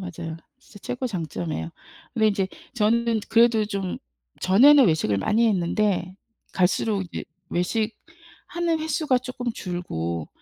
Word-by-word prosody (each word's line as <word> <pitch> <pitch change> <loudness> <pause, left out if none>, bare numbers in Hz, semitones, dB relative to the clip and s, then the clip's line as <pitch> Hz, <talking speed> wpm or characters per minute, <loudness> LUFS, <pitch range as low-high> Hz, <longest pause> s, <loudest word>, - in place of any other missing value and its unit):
맞아요. 170 -3 -6 0.2
진짜 220 -5 -16
최고의 250 +4 -3
장점이에요. 90 - -4 0.4
근데 220 -1 +3
인제 195 -2 0 0.3
저는 230 0 +2
그래도 230 -1 +4
좀 195 -3 -4 0.4
전에는 265 +8 +7
외식을 155 - +1
많이 220 - +2
했는데 185 -1 0 0.4
갈수록 195 +2 +1
이제 175 - -6 0.3
외식하는 325 - -3
횟수가 310 -4 +1
쪼끔 250 -1 -5
줄고 85 - -4
210 Hz, 290 characters per minute, -24 LUFS, 175-240 Hz, 0.4 s, 전에는